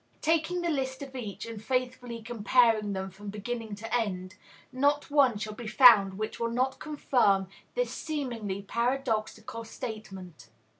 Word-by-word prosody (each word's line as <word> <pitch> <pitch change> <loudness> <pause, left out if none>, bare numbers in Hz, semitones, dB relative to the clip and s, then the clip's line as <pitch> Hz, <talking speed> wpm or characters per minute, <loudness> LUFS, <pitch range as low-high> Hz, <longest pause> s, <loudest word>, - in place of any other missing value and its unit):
Taking 330 +3 +1
the 345 - 0
lists 265 -2 -2
of 270 -1 -10
each, 205 -6 -5
and 225 -2 -8
faithfully 250 -2 -2
comparing 225 -2 +3
them 190 0 -4
from 200 +2 -9
beginning 220 +1 -5
to 225 +3 -3
end, 185 -5 -2 0.4
not 285 +3 +1
one 270 -6 +4
shall 215 +1 -4
be 230 +1 -8
found 215 -5 +7
which 215 +2 -4
will 230 0 0
not 255 +3 0
confirm 245 -10 +2 0.3
this - - 0
seemingly 235 -10 -4
paradoxical 230 -1 -2
statement. 195 - -8
230 Hz, 145 wpm, -29 LUFS, 205-260 Hz, 0.4 s, found